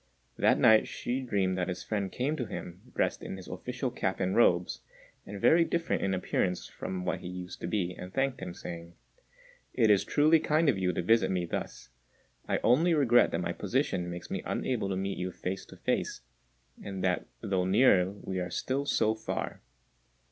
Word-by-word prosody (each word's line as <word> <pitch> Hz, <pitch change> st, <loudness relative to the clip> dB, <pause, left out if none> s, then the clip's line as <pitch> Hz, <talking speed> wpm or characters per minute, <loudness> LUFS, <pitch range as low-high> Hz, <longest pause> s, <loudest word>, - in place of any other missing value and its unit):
That -, -, +3 dB
night 110 Hz, -1 st, +6 dB
Hsü 130 Hz, +1 st, -3 dB
dreamed 95 Hz, -3 st, +1 dB
that 90 Hz, -, 0 dB
his 90 Hz, -, -4 dB
friend 100 Hz, -3 st, -2 dB
came 140 Hz, +5 st, -1 dB
to 125 Hz, -7 st, -3 dB
him, 90 Hz, -2 st, -8 dB
dressed -, -, 0 dB
in -, -, -6 dB
his 95 Hz, -, -10 dB
official 125 Hz, +7 st, -4 dB
cap 95 Hz, -6 st, -2 dB
and 95 Hz, 0 st, 0 dB
robes, 90 Hz, -7 st, +3 dB, 0.5 s
and 100 Hz, 0 st, -6 dB
very 165 Hz, -, +5 dB
different 165 Hz, 0 st, -1 dB
in 95 Hz, -1 st, +1 dB
appearance 90 Hz, 0 st, -1 dB
from 90 Hz, -1 st, -5 dB
what 90 Hz, -, -1 dB
he -, -, -8 dB
used 90 Hz, 0 st, -7 dB
to -, -, -3 dB
be, 90 Hz, -1 st, -1 dB
and 90 Hz, +1 st, -9 dB
thanked 135 Hz, +3 st, 0 dB
him, 90 Hz, -2 st, -6 dB
saying, 85 Hz, -1 st, -8 dB, 0.8 s
"It 115 Hz, -4 st, +4 dB
is 100 Hz, -, +4 dB
truly 155 Hz, +2 st, +4 dB
kind 155 Hz, +1 st, +2 dB
of 110 Hz, -8 st, +1 dB
you 90 Hz, -1 st, +1 dB
to 90 Hz, -, -2 dB
visit 110 Hz, 0 st, +4 dB
me 90 Hz, -2 st, 0 dB
thus: 85 Hz, -, -5 dB, 0.6 s
I -, -, +2 dB
only 160 Hz, +9 st, +4 dB
regret 120 Hz, -5 st, +5 dB
that -, -, -2 dB
my -, -, -2 dB
position 90 Hz, -2 st, -1 dB
makes 85 Hz, 0 st, -7 dB
me -, -, -2 dB
unable 115 Hz, -6 st, -1 dB
to 95 Hz, -, -1 dB
meet 95 Hz, +1 st, -3 dB
you 90 Hz, 0 st, -2 dB
face 95 Hz, +2 st, -5 dB
to -, -, -13 dB
face, -, -, -1 dB, 0.6 s
and 95 Hz, -2 st, -5 dB
that 90 Hz, -1 st, 0 dB
though 95 Hz, -4 st, 0 dB
near 95 Hz, -2 st, +5 dB
we 95 Hz, -1 st, -5 dB
are 90 Hz, -, -3 dB
still 140 Hz, +2 st, -2 dB
so 110 Hz, -5 st, +2 dB
far. 110 Hz, -, -4 dB
95 Hz, 195 wpm, -30 LUFS, 90-125 Hz, 0.8 s, night